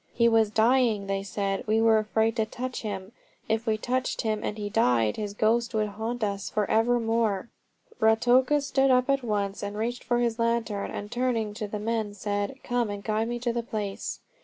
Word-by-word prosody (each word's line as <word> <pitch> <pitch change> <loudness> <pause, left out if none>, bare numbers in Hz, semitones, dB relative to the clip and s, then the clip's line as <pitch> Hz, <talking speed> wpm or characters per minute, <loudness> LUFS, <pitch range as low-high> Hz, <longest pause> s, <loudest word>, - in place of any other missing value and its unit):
"He 235 0 +4
was 225 -2 +4
dying," 225 -1 +3
they 195 0 -1
said. 195 0 -3
"We 220 +1 +3
were 225 -1 +5
afraid 220 +1 +1
to 220 - +2
touch 250 +3 -5
him. 195 -2 -5 0.4
If 225 +1 -1
we 215 -1 +2
touched 255 +3 -1
him 215 -2 -1
and 210 - -3
he 205 -1 -3
died, 125 - +2
his 205 -1 -4
ghost 230 +2 +1
would 215 -1 +1
haunt 220 +3 -4
us 200 -2 -2
for 210 -2 0
evermore." 225 -2 +1 0.5
Ruatoka 245 +6 +4
stood 270 -1 +2
up 255 +1 +4
at 275 0 +1
once 205 -4 -2
and 205 0 -4
reached 235 +3 -2
for 240 - +1
his 235 -1 0
lantern, 230 -3 0
and 205 0 -6
turning 240 -4 0
to 210 0 -4
the 210 - -4
men 215 -1 -2
said: 205 +3 -2
"Come 245 -3 0
and 205 0 -5
guide 220 +1 0
me 240 0 -2
to 240 -1 0
the 235 - -1
place." 210 -4 -4
220 Hz, 200 wpm, -27 LUFS, 205-235 Hz, 0.5 s, were